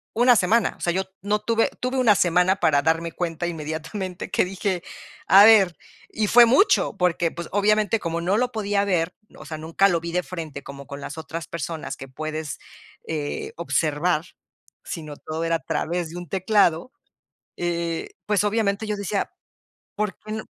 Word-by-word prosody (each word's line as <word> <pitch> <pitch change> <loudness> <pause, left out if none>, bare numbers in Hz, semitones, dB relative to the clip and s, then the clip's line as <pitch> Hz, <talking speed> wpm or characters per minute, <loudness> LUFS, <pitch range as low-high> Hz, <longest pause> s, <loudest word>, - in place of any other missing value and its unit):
una 245 +1 +6
semana, 220 +5 +2
o - - -19
sea, 175 - +1
yo 190 +1 0 0.2
no 210 +1 0
tuve 225 +1 +1
tuve 255 +1 -1
una 235 -5 +5
semana 180 +2 +3
para 155 -4 +3
darme 165 +1 +1
cuenta 170 -1 -3
inmediatamente, 165 +4 -5
que - - +2
dije: 185 -1 -2 0.4
"A 195 +2 +9
ver", 195 -6 +6 0.3
y 215 -1 -1
fue 240 +2 +8
mucho, 270 - +3
porque, 175 -2 +1
pues, 170 -1 -7
obviamente, 210 +2 +2
como 170 -2 -3
no 190 +5 +1
lo 250 +1 +1
podía 205 -2 0
ver, 175 -3 0 0.2
o - - -11
sea, 155 - -6
nunca 165 +5 +2
lo 170 -2 +1
vi 170 0 -5
de 180 - +2
frente, 160 -6 -7
como 140 0 -9
con 140 -1 -8
las 145 +3 -7
otras 160 +1 -6
personas 165 0 -5
que 135 - -9
puedes, 155 +2 -5 0.5
eh, 150 -2 -4
observar, 165 0 0 0.6
sino 155 -4 -7
todo 160 +1 -5
era 165 0 +1
a - - -19
través 170 0 -2
de 175 - -8
un 175 -4 -8
teclado, 190 +1 +2 0.7
eh, 170 -1 -2 0.2
pues, 210 -1 +2
obviamente, 210 0 0
yo 210 - -1
decía: 200 0 -2 0.7
"Por 210 -3 -2
qué 215 - -11
no" 220 0 -4
175 Hz, 180 wpm, -24 LUFS, 165-205 Hz, 0.7 s, A